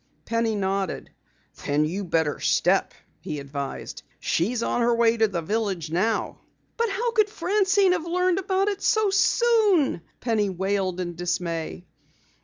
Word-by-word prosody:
Penny 230 Hz, -1 st, 0 dB
nodded. 195 Hz, -2 st, -2 dB, 0.5 s
"Then 145 Hz, +1 st, +1 dB
you 185 Hz, +6 st, -3 dB
better 165 Hz, -4 st, 0 dB
step," -, -, +2 dB, 0.2 s
he 150 Hz, -, -5 dB
advised. 140 Hz, 0 st, -6 dB, 0.2 s
"She's 225 Hz, +8 st, 0 dB
on 240 Hz, -, 0 dB
her 235 Hz, 0 st, +3 dB
way 230 Hz, 0 st, +3 dB
to 225 Hz, -1 st, +3 dB
the 175 Hz, -5 st, -3 dB
village 195 Hz, -5 st, -2 dB
now." 215 Hz, +7 st, 0 dB, 0.4 s
"But 465 Hz, -1 st, 0 dB
how 465 Hz, +5 st, -1 dB
could 430 Hz, -2 st, +2 dB
Francine 390 Hz, 0 st, +2 dB
have 340 Hz, -2 st, -1 dB
learned 360 Hz, +1 st, +1 dB
about 385 Hz, +1 st, 0 dB
it 405 Hz, -1 st, -2 dB
so 430 Hz, -2 st, +2 dB
soon?" 410 Hz, -, +3 dB, 0.2 s
Penny 220 Hz, -4 st, 0 dB
wailed 190 Hz, 0 st, -1 dB
in 175 Hz, -1 st, -3 dB
dismay. 170 Hz, 0 st, -3 dB
225 Hz, 145 wpm, -25 LUFS, -, 0.5 s, her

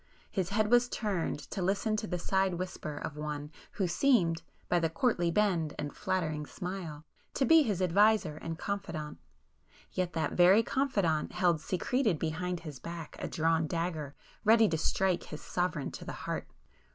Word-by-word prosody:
His 190 Hz, -3 st, -1 dB
head 210 Hz, +2 st, +1 dB
was 245 Hz, 0 st, +5 dB
turned 195 Hz, -11 st, -1 dB
to 190 Hz, -, -3 dB
listen 200 Hz, +4 st, +1 dB
to 215 Hz, -, -3 dB
the 180 Hz, -, -2 dB
side 190 Hz, +1 st, +1 dB
whisper 170 Hz, -4 st, -5 dB
of 150 Hz, -, -5 dB
one 150 Hz, 0 st, -4 dB, 0.2 s
who 190 Hz, -, 0 dB
seemed, 175 Hz, -5 st, +3 dB, 0.3 s
by 175 Hz, -, +3 dB
the 165 Hz, -1 st, +1 dB
courtly 175 Hz, -, +1 dB
bend 170 Hz, -5 st, +1 dB
and 145 Hz, -1 st, -4 dB
flattering 155 Hz, -5 st, -1 dB
smile, 175 Hz, -5 st, -6 dB, 0.3 s
to 270 Hz, -, +2 dB
be 325 Hz, +2 st, +7 dB
his 205 Hz, -, 0 dB
adviser 200 Hz, -3 st, +3 dB
and 165 Hz, 0 st, -5 dB
confidant,—yet 180 Hz, 0 st, -6 dB
that 160 Hz, -, -1 dB
very 185 Hz, +5 st, +6 dB
confidant 200 Hz, -, 0 dB
held 170 Hz, -4 st, +2 dB
secreted 215 Hz, -, 0 dB
behind 165 Hz, +3 st, -2 dB
his 150 Hz, -6 st, -8 dB
back, 165 Hz, +1 st, -7 dB
a -, -, -3 dB
drawn 160 Hz, 0 st, +1 dB
dagger, 160 Hz, -4 st, -3 dB, 0.3 s
ready 220 Hz, 0 st, +6 dB
to 165 Hz, -, 0 dB
strike 185 Hz, +2 st, +1 dB
his 150 Hz, -, -8 dB
sovereign 175 Hz, -5 st, -1 dB
to -, -, -8 dB
the -, -, -6 dB
heart. -, -, -3 dB
175 Hz, 165 wpm, -31 LUFS, 160-200 Hz, 0.3 s, be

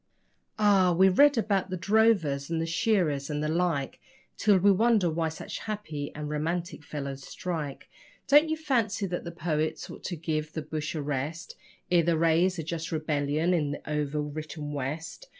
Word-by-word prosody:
Ah! 200 Hz, -4 st, +4 dB
we 190 Hz, +3 st, +5 dB
read 285 Hz, +8 st, +5 dB
about 200 Hz, -3 st, +1 dB
the 185 Hz, -, -3 dB
drovers 190 Hz, -9 st, +2 dB
and 165 Hz, -1 st, -1 dB
the 165 Hz, -, 0 dB
shearers 165 Hz, -, +1 dB
and 150 Hz, 0 st, -2 dB
the -, -, 0 dB
like 160 Hz, -4 st, -1 dB, 0.4 s
Till 205 Hz, -3 st, +4 dB
we 200 Hz, +2 st, +5 dB
wonder 210 Hz, -3 st, +3 dB
why 160 Hz, 0 st, 0 dB
such 160 Hz, -, -7 dB
happy 160 Hz, -10 st, -5 dB
and 150 Hz, 0 st, -5 dB
romantic 160 Hz, +2 st, -3 dB
fellows 140 Hz, -2 st, -5 dB
strike. 155 Hz, -2 st, -5 dB, 0.4 s
Don't 295 Hz, +3 st, +6 dB
you 315 Hz, -, 0 dB
fancy 235 Hz, -10 st, 0 dB
that 175 Hz, -2 st, -4 dB
the 170 Hz, -, -5 dB
poets 160 Hz, -2 st, -2 dB
ought -, -, -11 dB
to 180 Hz, -, -3 dB
give 155 Hz, -1 st, -3 dB
the 160 Hz, -, -4 dB
bush 155 Hz, +1 st, -4 dB
a 150 Hz, -, -2 dB
rest 145 Hz, +3 st, -4 dB, 0.4 s
Ere 175 Hz, -1 st, +5 dB
they 165 Hz, 0 st, +2 dB
raise 165 Hz, +3 st, +3 dB
a 165 Hz, -, -3 dB
just 165 Hz, +1 st, -4 dB
rebellion 155 Hz, +1 st, 0 dB
in 155 Hz, -4 st, +1 dB
the 145 Hz, -, -5 dB
over 150 Hz, 0 st, -1 dB
written 150 Hz, 0 st, -6 dB
West? 155 Hz, -, -5 dB
165 Hz, 180 wpm, -28 LUFS, 150-190 Hz, 0.4 s, Don't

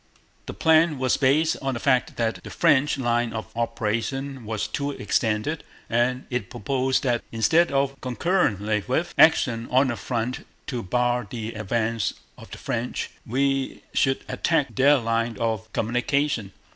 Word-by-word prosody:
The -, -, -6 dB
plan 160 Hz, -1 st, +4 dB
was 130 Hz, -1 st, +2 dB
based 150 Hz, +4 st, +2 dB
on 135 Hz, -2 st, -1 dB
the -, -, -3 dB
fact 130 Hz, -1 st, +1 dB
that 110 Hz, -5 st, -2 dB
the -, -, -8 dB
French 145 Hz, +1 st, +3 dB
line 120 Hz, -3 st, 0 dB
of 110 Hz, 0 st, -6 dB
operation 115 Hz, +3 st, -2 dB
was 110 Hz, 0 st, -2 dB
too 140 Hz, +6 st, -3 dB
extended, 110 Hz, +3 st, -1 dB, 0.3 s
and 125 Hz, +2 st, +1 dB
it 120 Hz, -6 st, -2 dB
proposed 130 Hz, +4 st, 0 dB
that 120 Hz, -3 st, +1 dB
instead 160 Hz, +10 st, +3 dB
of, 135 Hz, 0 st, +1 dB
or -, -, -21 dB
concurrently 115 Hz, -, 0 dB
with, 160 Hz, +7 st, -1 dB
action 120 Hz, -7 st, +4 dB
on 130 Hz, +1 st, +3 dB
the 120 Hz, -, -1 dB
front 120 Hz, +1 st, -3 dB, 0.2 s
to 125 Hz, -4 st, -3 dB
bar 120 Hz, +3 st, 0 dB
the 115 Hz, -1 st, -5 dB
advance 110 Hz, +1 st, -1 dB, 0.2 s
of -, -, -13 dB
the -, -, -8 dB
French, -, -, -3 dB, 0.2 s
we 135 Hz, +2 st, 0 dB
should 135 Hz, -1 st, +1 dB
attack 160 Hz, -4 st, 0 dB
their 140 Hz, +2 st, +5 dB
line 115 Hz, -1 st, -1 dB
of 110 Hz, -1 st, -2 dB
communication. 125 Hz, -1 st, 0 dB
125 Hz, 155 wpm, -24 LUFS, 115-135 Hz, 0.3 s, their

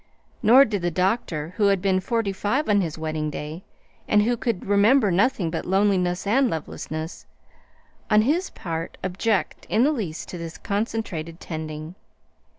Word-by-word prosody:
Nor 250 Hz, +4 st, +7 dB
did 205 Hz, -5 st, -2 dB
the 175 Hz, -, +1 dB
doctor 180 Hz, -3 st, -1 dB
who 210 Hz, -2 st, +4 dB
had 195 Hz, -1 st, +3 dB
been 190 Hz, 0 st, +2 dB
forty 205 Hz, +1 st, -1 dB
five 245 Hz, +10 st, -1 dB
on 205 Hz, -1 st, +4 dB
his 165 Hz, -4 st, -3 dB
wedding 155 Hz, -1 st, -2 dB
day, 150 Hz, +4 st, -6 dB, 0.4 s
and 210 Hz, 0 st, +4 dB
who 240 Hz, +3 st, +1 dB
could 230 Hz, -5 st, -2 dB
remember 205 Hz, +3 st, +4 dB
nothing 185 Hz, -2 st, +2 dB
but 165 Hz, -, -3 dB
loneliness 185 Hz, -2 st, +1 dB
and 255 Hz, +5 st, +3 dB
lovelessness 155 Hz, 0 st, -5 dB, 0.8 s
on 215 Hz, -1 st, +5 dB
his 330 Hz, -, +1 dB
part 165 Hz, -1 st, -5 dB
object 195 Hz, +3 st, -1 dB
in 225 Hz, -, +3 dB
the 295 Hz, -, +4 dB
least 195 Hz, -, -4 dB
to 180 Hz, -, -6 dB
this 165 Hz, -1 st, -7 dB
concentrated 200 Hz, -6 st, -3 dB
"tending." 155 Hz, 0 st, -6 dB
195 Hz, 155 wpm, -24 LUFS, 165-220 Hz, 0.8 s, Nor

